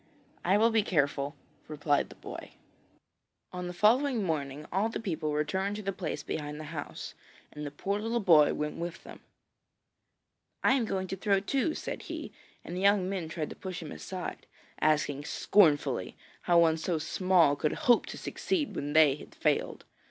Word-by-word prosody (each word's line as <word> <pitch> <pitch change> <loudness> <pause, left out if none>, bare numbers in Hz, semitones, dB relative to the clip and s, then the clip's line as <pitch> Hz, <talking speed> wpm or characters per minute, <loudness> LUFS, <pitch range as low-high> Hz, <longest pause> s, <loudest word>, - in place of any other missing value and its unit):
'I 190 +3 +4
will 225 +2 +5
be 220 -1 +4
careful,' 145 -6 0 0.3
replied 145 -1 0
the - - -12
boy. - - -9 1.0
On 180 0 -4
the - - -4
following 235 +6 +3
morning 150 -4 -3
all 200 +5 +1
the - - -4
people 160 -8 -2
returned 190 +7 -1
to 210 - -6
the 195 0 -2
place 180 -4 -4
behind 150 -1 -4
the - - -6
house, 150 -3 -6 0.4
and 150 0 -5
the - - -3
poor 195 +8 -2
little 230 +2 -1
boy 165 -8 +6
went 150 0 -3
with 170 +1 -5
them. - - -11 1.4
'I - - +5
am 260 -4 +2
going 190 -3 -2
to - - -2
throw, 195 0 +2
too,' 275 - 0
said - - -5
he, - - -6 0.3
and 175 - -6
the 185 - -3
young 200 -2 +4
men 185 -4 -3
tried 160 -2 -4
to - - -7
push 185 -3 -6
him 155 - -8
aside, 75 -1 -6 0.3
asking 150 -2 +1
scornfully 145 - +2 0.3
how 175 - +6
one 165 -1 +5
so 165 +1 -1
small 170 -1 +3
could 150 +1 0
hope 240 -3 +5
to - - -7
succeed 330 -7 -2
when 145 +1 -3
they 155 -3 +6
had 145 - -11
failed. - - 0
175 Hz, 180 wpm, -30 LUFS, 150-200 Hz, 1.4 s, boy